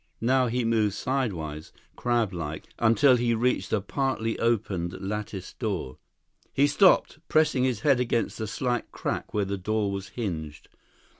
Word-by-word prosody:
Now 130 +2 +3
he 120 +1 0
moved 110 -3 +2
sidewise, 85 - -3 0.2
crab 120 -5 0
like, 80 -3 -5
until 125 +3 +5
he 120 -1 +1
reached 125 +3 0
a 110 - +1
partly 115 0 -1
opened 100 -7 0
latticed 100 -1 -5
door. 100 - -3 0.6
He 140 - +5
stopped, 155 +3 +4
pressing 150 -5 +3
his 125 -5 -1
head 140 -4 +4
against 120 -2 -1
the 110 - -2
slight 120 +2 -2
crack - - -3
where 105 -1 0
the 100 0 -3
door 105 +1 0
was 100 -1 -4
hinged. 80 -9 -5
110 Hz, 150 wpm, -27 LUFS, 95-125 Hz, 0.6 s, until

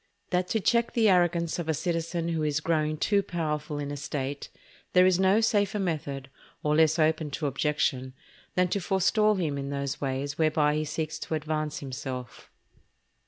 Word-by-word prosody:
—_That 180 0 +1
to 220 - 0
check 235 +3 +2
the 225 -3 +4
arrogance 175 -2 +2
of 165 -2 -4
a 160 - +2
Citizen 165 +1 -2
who 165 -2 -1
is 150 -1 +1
growing 155 -1 0
too 200 +6 +2
powerful 155 -5 -3
in 145 -1 -4
a - - -3
State, 140 0 -4 0.4
there 180 0 +6
is 185 -1 +3
no 190 +3 +4
safer 210 -2 +2
Method, 145 -8 -3 0.3
or 150 0 +2
less 160 0 +4
open 155 -1 +2
to 145 +2 -4
objection, 135 -2 0 0.4
than 180 0 +3
to 200 - 0
forestall 210 +3 +2
him 155 -7 -1
in 140 0 -4
those 140 -1 -3
Ways 140 +2 -3
whereby 155 -1 +3
he 155 +1 -1
seeks 155 +1 -3
to 160 - -3
advance 155 0 -2
himself_. 130 -3 -6
155 Hz, 175 wpm, -28 LUFS, 145-180 Hz, 0.4 s, there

